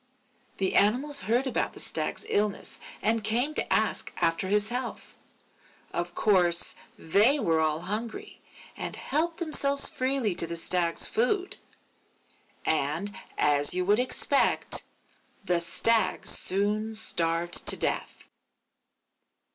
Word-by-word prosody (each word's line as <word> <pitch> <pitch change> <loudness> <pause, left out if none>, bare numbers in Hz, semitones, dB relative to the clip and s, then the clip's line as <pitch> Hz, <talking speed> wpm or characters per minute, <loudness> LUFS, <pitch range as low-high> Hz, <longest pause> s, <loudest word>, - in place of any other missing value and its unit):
The 190 -1 -2
Animals 260 +8 +2
heard 235 +7 -1
about 260 - -2
the - - -7
Stag's - - -1
illness 205 -1 -1 0.2
and 225 0 0
came 240 +8 +1
to - - -3
ask - - +1
after 165 +2 -1
his 210 +2 +2
health. 245 0 -6 0.8
Of 175 0 -5
course, 175 -5 +2 0.2
they 215 - +2
were 165 -9 0
all 155 0 -1
hungry, 215 +5 -6 0.3
and - - -6
helped 325 +4 -2
themselves 280 -4 +3
freely 255 -5 -2
to 170 - +1
the 170 - -5
Stag's 170 0 +2
food; 365 - -1 1.1
and 160 +7 -2 0.2
as 145 +2 +3
you 180 0 -2
would 205 +4 +2
expect, 260 +2 +3 0.6
the 180 -2 0
Stag 185 +3 +1
soon 210 +3 +1
starved 170 -3 0
to - - +6
death. - - -3
205 Hz, 120 wpm, -26 LUFS, 175-245 Hz, 1.1 s, to